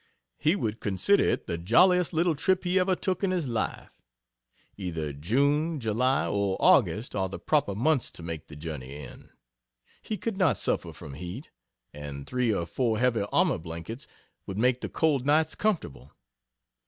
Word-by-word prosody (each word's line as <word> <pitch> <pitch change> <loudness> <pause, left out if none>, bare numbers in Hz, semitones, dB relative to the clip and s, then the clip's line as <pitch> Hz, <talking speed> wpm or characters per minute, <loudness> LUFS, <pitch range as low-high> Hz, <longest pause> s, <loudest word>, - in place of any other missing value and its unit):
He 155 +5 +3
would 110 - -2
consider 105 - +2
it - - 0
the 85 - -3
jolliest 180 - +4
little 170 +1 +2
trip 185 +5 +1
he 180 +1 +2
ever 185 0 +2
took 185 +1 -2
in 195 - +2
his 180 -6 -1
life. 115 -3 -3 0.8
Either 80 -6 -4
June, 140 - +1
July, 125 +5 +1
or 100 -2 0
August 110 +5 +3
are 95 -2 0
the - - -6
proper 140 -10 +1
months 135 +3 +1
to 85 - -10
make 80 -2 -6
the 75 - -11
journey 75 -4 -7
in. 75 -1 -11 0.7
He 215 - -4
could 195 +2 -3
not 185 -7 +3
suffer - - -1
from 70 - -10
heat, 90 - -8 0.4
and 70 -1 -7
three 125 -2 0
or 85 -5 -1
four 110 - 0
heavy 115 -3 +2
army 175 - +2
blankets 85 - -7 0.4
would 95 - -5
make 125 +2 +2
the - - -4
cold 150 -5 +1
nights 155 +3 +3
comfortable. 75 - -2
120 Hz, 165 wpm, -28 LUFS, -, 0.8 s, jolliest